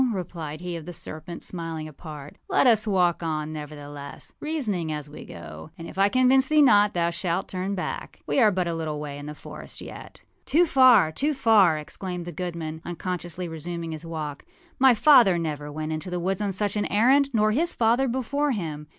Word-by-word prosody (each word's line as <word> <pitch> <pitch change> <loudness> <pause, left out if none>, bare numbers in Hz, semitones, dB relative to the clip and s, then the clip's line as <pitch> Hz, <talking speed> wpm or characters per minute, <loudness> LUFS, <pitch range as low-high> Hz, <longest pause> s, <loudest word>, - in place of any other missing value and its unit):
â 250 -3 +2
replied 165 -4 -6
he 180 -1 -4
of 165 -1 -8
the 175 - -6
serpent, 160 +1 -6
smiling 165 -3 -5
apart. 150 -1 -10
âLet - - +3
us 225 -3 +4
walk 180 -4 +2
on, 155 -2 -3
nevertheless, 145 -2 -8
reasoning 215 - -2
as 150 -1 -4
we 145 - -10
go; 80 -2 -10
and 165 - -8
if - - -10
I 195 +1 +3
convince 255 +2 +4
thee 305 0 +5
not 205 -6 +5
thou 170 0 +1
shalt 175 +1 -2
turn 190 +2 -3
back. 185 - -5
We - - +1
are 220 -4 +6
but 185 -3 -1
a 170 - -1
little 155 -2 -3
way 145 -1 -6
in 145 - -8
the 150 - -7
forest - - -9
yet.â - - -12
âToo 345 +4 +4
far! 255 - +6
too 290 - -1
far!â 205 -11 +4
exclaimed 180 +3 -6
the 175 - -6
goodman, 165 -2 -5
unconsciously 175 0 -4
resuming 165 +1 -5
his 155 0 -6
walk. 155 -3 -5 0.4
âMy 260 -3 +6
father 240 - +6
never 150 -3 -4
went 155 +1 -4
into 155 +4 -4
the 180 0 -2
woods 190 +3 -1
on 205 -1 0
such 205 +2 0
an 210 - 0
errand, 265 +7 +4
nor 215 -3 +2
his 335 +9 0
father 240 +4 +3
before 265 +3 0
him. 155 -7 -5
175 Hz, 200 wpm, -25 LUFS, 155-215 Hz, 0.4 s, are